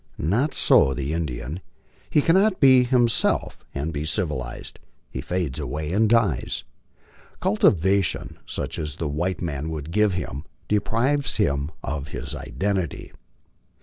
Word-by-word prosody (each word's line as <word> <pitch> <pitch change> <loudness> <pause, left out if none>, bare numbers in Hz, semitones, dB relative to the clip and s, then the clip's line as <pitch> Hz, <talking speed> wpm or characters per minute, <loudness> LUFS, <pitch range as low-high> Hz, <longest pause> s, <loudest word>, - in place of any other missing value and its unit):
Not 110 - 0
so 65 - +5
the 70 +2 -2
Indian. 75 0 -3 0.5
He 150 - +3
cannot 190 +4 +3
be 130 -3 +7
himself 120 -2 +2
and 75 +4 -3
be 75 0 -2
civilized; 75 - -3 0.3
he 65 - -4
fades 80 -4 -2
away 75 +3 -3
and 110 +2 +3
dies. 105 - +1 0.8
Cultivation 95 -2 +2
such - - -4
as 75 -2 -4
the 80 - -3
1 70 - -4
white 90 +3 -1
man 75 -2 -3
would 80 0 -5
give 105 0 +2
him 75 -4 -5 0.2
deprives 120 +7 +1
him 70 +1 +1
of 70 +1 -3
his - - -5
identity. 85 +7 -3
85 Hz, 135 wpm, -24 LUFS, 70-105 Hz, 0.8 s, be